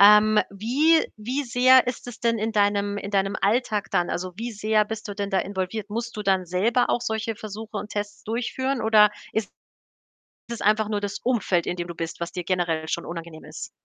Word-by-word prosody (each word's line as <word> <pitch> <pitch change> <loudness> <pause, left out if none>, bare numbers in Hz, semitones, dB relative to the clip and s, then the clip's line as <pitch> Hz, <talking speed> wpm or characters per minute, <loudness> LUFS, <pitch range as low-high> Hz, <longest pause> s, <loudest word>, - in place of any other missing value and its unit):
Ähm, 210 +1 +7
wie 270 +11 +3
wie 255 +7 -3
sehr 255 +1 +5
ist 250 0 -4
es 240 - -9
denn 230 -1 +1
in 220 +1 -1
deinem 205 -1 +1
in 200 - -6
deinem 195 0 +1
Alltag 210 -1 +1
dann? 175 - +1
Also, 185 +1 -3
wie 230 +2 -4
sehr 215 +1 +2
bist 220 0 -6
du 205 - -4
denn 200 -1 -3
da 195 - +2
involviert? 200 +2 -4
Musst 230 +2 -4
du 210 - -3
dann 190 -2 +2
selber 220 +8 +2
auch - - +1
solche 220 -1 -2
Versuche 215 0 -7
und 210 - -7
Tests 205 0 -4
durchführen 250 +3 -2
oder 215 -1 +6 0.2
ist 220 -3 -1 1.0
das 235 - -5
einfach 215 +1 +3
nur 205 -1 -1
das 200 -1 -3
Umfeld, 210 -8 +1
in - - -1
dem 175 0 -3
du 170 - -7
bist, 165 0 -5
was 170 - -4
dir 180 - -4
generell 170 -3 -1
schon 170 - -2
unangenehm 165 -2 -7
ist? - - -8
210 Hz, 210 wpm, -25 LUFS, 195-225 Hz, 1.0 s, Ähm